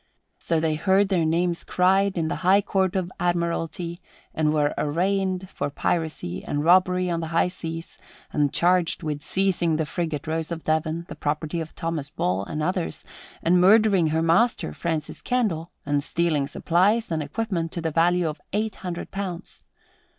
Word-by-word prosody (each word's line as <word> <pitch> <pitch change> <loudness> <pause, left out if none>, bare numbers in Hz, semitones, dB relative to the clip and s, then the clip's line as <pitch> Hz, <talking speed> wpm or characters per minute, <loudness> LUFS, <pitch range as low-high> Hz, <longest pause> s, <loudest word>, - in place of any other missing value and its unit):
So 165 -1 0
they 160 -1 +1
heard 190 +5 +2
their 175 -4 +2
names 170 +2 0
cried 190 +1 +2
in 160 -1 0
the - - -2
High 190 +2 +4
Court 190 -1 0
of 185 -1 -1
Admiralty 170 0 -1 0.3
and 155 -1 +1
were 150 -1 +1
arraigned 185 +4 0
for - - -3
piracy 155 - -2
and 145 0 -2
robbery 180 +1 +4
on 170 -1 -1
the 165 - -3
high 165 +2 +2
seas 165 -2 -7 0.3
and 145 -2 +2
charged 175 -1 +2
with 150 -2 -3
seizing 180 -2 +1
the 160 0 0
frigate 160 -3 -3
Rose 160 +1 -2
of 165 -1 -4
Devon, 160 +1 -1
the - - -7
property 150 +2 -2
of 160 - -8
Thomas 165 -4 -3
Ball 95 -8 -1
and 150 +7 -3
others, 120 - -2 0.4
and 180 +2 +4
murdering 200 -3 +5
her 160 +1 +1
master, 170 - +2
Francis 160 - -3
Candle, 200 -10 0 0.2
and 145 0 +1
stealing 155 -2 0
supplies 190 +9 +1
and 160 -1 0
equipment 165 +1 -2
to 175 - -3
the 160 -1 -1
value 170 +2 +3
of 155 0 -5
eight 215 +1 -1
hundred 175 -2 -6
pounds. 190 -2 -6
170 Hz, 170 wpm, -24 LUFS, 155-185 Hz, 0.4 s, murdering